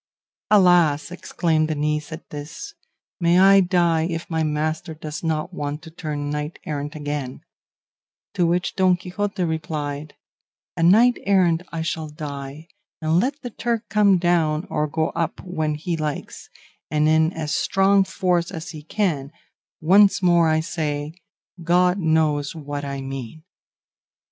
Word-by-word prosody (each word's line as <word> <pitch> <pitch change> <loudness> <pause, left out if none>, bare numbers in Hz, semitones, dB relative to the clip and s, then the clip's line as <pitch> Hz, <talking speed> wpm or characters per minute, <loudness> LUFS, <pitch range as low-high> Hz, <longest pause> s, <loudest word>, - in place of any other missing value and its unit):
"Alas!" 175 -7 +4
exclaimed 165 -3 0
the 155 - -2
niece 150 +1 -2
at 160 +1 -9
this, 150 - -8 0.5
"may 170 0 +4
I 195 +1 +7
die 170 -3 +2
if 165 0 -5
my 160 0 0
master 155 +2 -2
does 155 0 -7
not 160 +2 -2
want 150 0 -4
to 160 - -11
turn 150 -3 -4
knight 150 +2 -4
errant 145 0 -4
again;" 145 -3 -4 0.9
to 175 - +2
which 175 +2 0
Don 185 -2 +3
Quixote 190 +2 -3
replied, 155 -2 -4 0.6
"A - - -3
knight 225 +9 +5
errant 180 -4 +3
I 165 -1 -3
shall 160 -1 -3
die, 145 0 -7 0.3
and 160 +1 +2
let 275 +7 -2
the 245 - -5
Turk 235 0 -3
come 200 -1 +4
down 170 -2 +1
or 150 0 0
go 160 +1 -1
up 165 -1 -3
when 155 -4 -2
he 165 +3 -3
likes, 155 -2 -5 0.4
and 150 0 +2
in 160 +1 +3
as 155 -2 -3
strong 195 0 +3
force 180 -3 0
as 165 -5 -7
he 155 -3 -9
can, 150 -5 -2 0.5
once 195 +4 +5
more 170 -2 +4
I 155 0 +2
say, 150 -2 -3 0.5
God 180 +2 +3
knows 155 -3 +1
what 145 -2 -5
I 140 -1 -4
mean." 135 +2 -7
160 Hz, 150 wpm, -22 LUFS, 150-180 Hz, 0.9 s, I